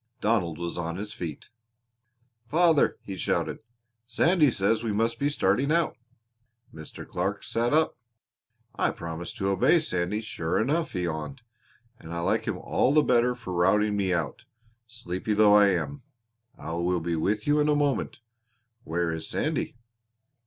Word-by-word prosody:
Donald 100 Hz, -9 st, 0 dB
was 85 Hz, 0 st, -4 dB
on 85 Hz, 0 st, -3 dB
his 105 Hz, +1 st, -5 dB
feet. 80 Hz, -5 st, -7 dB, 1.0 s
"Father," 165 Hz, 0 st, +3 dB
he 100 Hz, -, -6 dB
shouted, 90 Hz, -, -1 dB, 0.5 s
"Sandy 155 Hz, +5 st, +3 dB
says 105 Hz, 0 st, +1 dB
we 115 Hz, -, -1 dB
must 115 Hz, +3 st, 0 dB
be 140 Hz, -, +1 dB
starting 135 Hz, +1 st, +1 dB
out." 170 Hz, 0 st, +1 dB, 0.8 s
Mr. 80 Hz, -1 st, -10 dB
Clark 95 Hz, +3 st, -2 dB
sat 115 Hz, +1 st, -1 dB
up. 155 Hz, +2 st, +2 dB, 0.8 s
"I -, -, +1 dB
promised 85 Hz, +1 st, -6 dB
to 95 Hz, -, -1 dB
obey 100 Hz, -, +4 dB
Sandy, 95 Hz, -, -1 dB
sure 80 Hz, -7 st, -2 dB
enough," 155 Hz, +7 st, 0 dB
he 90 Hz, -3 st, -2 dB
yawned, 85 Hz, -, -4 dB, 0.6 s
"and 80 Hz, -, -11 dB
I 85 Hz, -, -2 dB
like -, -, 0 dB
him -, -, -2 dB
all 130 Hz, -, +1 dB
the 150 Hz, -, +6 dB
better 125 Hz, 0 st, +3 dB
for 120 Hz, -7 st, -7 dB
routing 105 Hz, +4 st, +2 dB
me 95 Hz, -2 st, 0 dB
out, 85 Hz, -5 st, -2 dB, 0.4 s
sleepy 110 Hz, -3 st, -3 dB
though 105 Hz, -1 st, +6 dB
I 105 Hz, -1 st, +7 dB
am. 80 Hz, -7 st, -1 dB, 0.6 s
I 80 Hz, -, -6 dB
will 85 Hz, +1 st, 0 dB
be 85 Hz, +1 st, -2 dB
with 105 Hz, +7 st, -1 dB
you 145 Hz, +1 st, +3 dB
in 150 Hz, 0 st, +2 dB
a 150 Hz, -, +3 dB
moment. 145 Hz, -4 st, -1 dB, 0.6 s
Where 85 Hz, +1 st, -1 dB
is 80 Hz, -1 st, -4 dB
Sandy?" 155 Hz, -3 st, -2 dB
105 Hz, 160 wpm, -27 LUFS, 85-125 Hz, 1.0 s, I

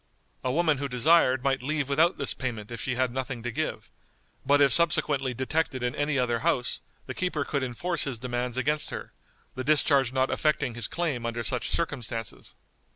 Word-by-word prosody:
A 125 Hz, -, 0 dB
woman 155 Hz, -1 st, +2 dB
who 140 Hz, -, -2 dB
desired 130 Hz, 0 st, +4 dB
might 135 Hz, -2 st, +1 dB
leave 145 Hz, +1 st, -1 dB
without 160 Hz, +5 st, +3 dB
this -, -, +1 dB
payment 115 Hz, -5 st, -5 dB
if 115 Hz, -4 st, -5 dB
she 125 Hz, +3 st, -1 dB
had 130 Hz, -1 st, +1 dB
nothing 130 Hz, -2 st, -4 dB
to 120 Hz, -, -3 dB
give, 155 Hz, +6 st, -4 dB, 0.5 s
but 145 Hz, +1 st, +4 dB
if 140 Hz, -2 st, +5 dB
subsequently 155 Hz, -6 st, +2 dB
detected 130 Hz, 0 st, -1 dB
in 125 Hz, 0 st, 0 dB
any 145 Hz, -1 st, 0 dB
other 120 Hz, -2 st, +1 dB
house 125 Hz, +1 st, 0 dB, 0.2 s
the -, -, -5 dB
keeper 170 Hz, -6 st, -1 dB
could 140 Hz, -, -1 dB
enforce 145 Hz, +7 st, 0 dB
his 135 Hz, -4 st, -3 dB
demands 125 Hz, +1 st, -3 dB
against 150 Hz, +4 st, +1 dB
her, -, -, -7 dB, 0.4 s
the 130 Hz, -, -4 dB
discharge 140 Hz, -3 st, +3 dB
not 130 Hz, 0 st, +1 dB
affecting 150 Hz, -5 st, 0 dB
his 115 Hz, -1 st, -1 dB
claim 155 Hz, -9 st, -2 dB
under 115 Hz, 0 st, -3 dB
such 95 Hz, -, 0 dB
circumstances. 120 Hz, -9 st, -4 dB
130 Hz, 185 wpm, -27 LUFS, 125-150 Hz, 0.5 s, if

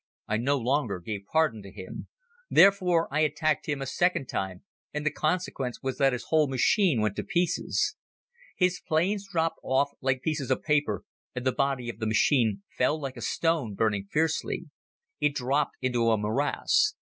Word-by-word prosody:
I 110 Hz, -, 0 dB
no 140 Hz, +5 st, +1 dB
longer 125 Hz, -6 st, 0 dB
gave 100 Hz, +2 st, -6 dB
pardon 155 Hz, -9 st, +2 dB
to 100 Hz, -, -11 dB
him. 95 Hz, 0 st, -8 dB, 0.4 s
Therefore, 185 Hz, -4 st, +5 dB
I 155 Hz, -, +2 dB
attacked 155 Hz, 0 st, +1 dB
him 145 Hz, -2 st, -1 dB
a -, -, -4 dB
second 175 Hz, +1 st, +1 dB
time 95 Hz, -6 st, -4 dB, 0.3 s
and 150 Hz, 0 st, -4 dB
the 155 Hz, -, +2 dB
consequence 155 Hz, -6 st, -2 dB
was 130 Hz, 0 st, -3 dB
that 135 Hz, -1 st, +4 dB
his 125 Hz, -1 st, -3 dB
whole 155 Hz, -2 st, +4 dB
machine 135 Hz, -, +2 dB
went 105 Hz, -2 st, 0 dB
to -, -, -2 dB
pieces. 180 Hz, -3 st, 0 dB, 0.6 s
His 180 Hz, -1 st, +2 dB
planes 195 Hz, +6 st, 0 dB
dropped 165 Hz, -2 st, 0 dB
off 140 Hz, +2 st, +1 dB
like 130 Hz, 0 st, 0 dB
pieces 145 Hz, -5 st, -2 dB
of -, -, 0 dB
paper 150 Hz, -2 st, +1 dB, 0.3 s
and 125 Hz, 0 st, -4 dB
the 130 Hz, -, +3 dB
body 135 Hz, -2 st, -1 dB
of 115 Hz, -2 st, -6 dB
the 110 Hz, -, -1 dB
machine 110 Hz, -2 st, +2 dB, 0.2 s
fell 145 Hz, +5 st, +2 dB
like 135 Hz, -3 st, -5 dB
a -, -, -9 dB
stone, 160 Hz, -11 st, 0 dB
burning 105 Hz, -2 st, 0 dB
fiercely. 160 Hz, +1 st, -1 dB, 0.5 s
It 150 Hz, -1 st, +1 dB
dropped 140 Hz, +3 st, 0 dB
into 120 Hz, -3 st, +1 dB
a 110 Hz, -, +3 dB
morass. 140 Hz, -, +1 dB
140 Hz, 175 wpm, -27 LUFS, 120-160 Hz, 0.6 s, Therefore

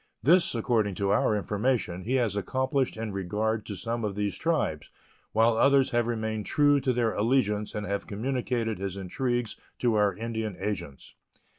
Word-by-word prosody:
This, 170 Hz, +2 st, +4 dB
according 110 Hz, -4 st, +1 dB
to 100 Hz, +1 st, 0 dB
our 105 Hz, +1 st, +3 dB
information, 105 Hz, -3 st, -1 dB
he 125 Hz, +4 st, 0 dB
has 115 Hz, -6 st, +1 dB
accomplished 130 Hz, +4 st, -1 dB
in 110 Hz, -1 st, -4 dB
regard 105 Hz, +3 st, -2 dB
to 105 Hz, -, -5 dB
some 115 Hz, +5 st, -3 dB
of 105 Hz, -2 st, -2 dB
these 105 Hz, -1 st, -1 dB
tribes, 155 Hz, -, -1 dB, 0.4 s
while 115 Hz, +1 st, +3 dB
others 135 Hz, +2 st, +4 dB
have 120 Hz, -1 st, +1 dB
remained 110 Hz, -2 st, -2 dB
true 145 Hz, -1 st, +4 dB
to 130 Hz, -, +1 dB
their 120 Hz, -2 st, +1 dB
allegiance 105 Hz, -2 st, +1 dB
and 105 Hz, 0 st, -3 dB
have 100 Hz, 0 st, -3 dB
communicated 115 Hz, -1 st, -2 dB
his 100 Hz, 0 st, -4 dB
intrigues 120 Hz, +5 st, -2 dB, 0.2 s
to 120 Hz, -2 st, +1 dB
our 105 Hz, -2 st, +2 dB
Indian 110 Hz, -3 st, -4 dB
agents. 90 Hz, -8 st, -5 dB
110 Hz, 165 wpm, -28 LUFS, 100-125 Hz, 0.4 s, This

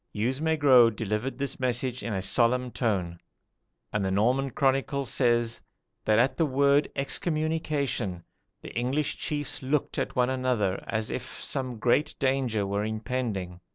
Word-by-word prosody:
"Hugues 125 Hz, +7 st, -1 dB
Maigrot 140 Hz, -8 st, +5 dB
delivered 110 Hz, +4 st, -2 dB
this 140 Hz, -1 st, -3 dB
message 125 Hz, 0 st, -1 dB
in 115 Hz, -, -4 dB
a 95 Hz, -2 st, -2 dB
solemn 125 Hz, +4 st, +2 dB
tone; 95 Hz, -9 st, -1 dB, 0.7 s
and 105 Hz, -2 st, 0 dB
the 95 Hz, -, 0 dB
Norman 125 Hz, +8 st, +2 dB
chronicle 135 Hz, 0 st, 0 dB
says 120 Hz, -2 st, +1 dB, 0.4 s
that 110 Hz, 0 st, +3 dB
at 125 Hz, +3 st, +3 dB
the 165 Hz, -, +3 dB
word 140 Hz, +2 st, +3 dB
EXCOMMUNICATION, 145 Hz, -, -1 dB, 0.4 s
the -, -, -9 dB
English 130 Hz, +5 st, -1 dB
chiefs 145 Hz, -1 st, -3 dB
looked 135 Hz, +2 st, -1 dB
at -, -, -3 dB
one 125 Hz, 0 st, +2 dB
another 125 Hz, -7 st, 0 dB
as 110 Hz, -1 st, -2 dB
if -, -, -2 dB
some 130 Hz, -3 st, -4 dB
great 125 Hz, +6 st, +1 dB
danger 130 Hz, -6 st, 0 dB
were 100 Hz, +1 st, -1 dB
impending. 110 Hz, -5 st, -3 dB
125 Hz, 145 wpm, -27 LUFS, 110-135 Hz, 0.7 s, Maigrot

